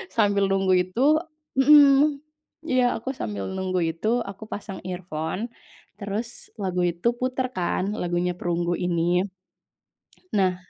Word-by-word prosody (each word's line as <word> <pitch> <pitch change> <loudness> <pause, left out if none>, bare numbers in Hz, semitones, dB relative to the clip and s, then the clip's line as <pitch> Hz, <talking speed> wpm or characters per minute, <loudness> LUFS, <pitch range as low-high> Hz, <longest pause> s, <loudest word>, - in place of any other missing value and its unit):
Sambil 205 -3 +3
nunggu 190 -1 +2
itu, 185 +6 -7 0.6
mhm, 285 +1 +6 0.5
iya, 255 -3 +3
aku 235 +4 -6
sambil 100 -2 -3
nunggu 185 -1 -1
itu, 165 +6 -4 0.2
aku 195 +2 -9
pasang 195 -2 -6
earphone, 175 -1 -4 0.6
terus 210 +2 -3 0.3
lagu 180 -2 -1
itu 170 +6 -2
putar, 255 0 -1
kan, 180 +1 0 0.2
lagunya 175 0 0
Perunggu 175 0 -1
ini. 180 +1 +1 1.1
Nah, 190 -3 +2
190 Hz, 120 wpm, -25 LUFS, 175-225 Hz, 1.1 s, mhm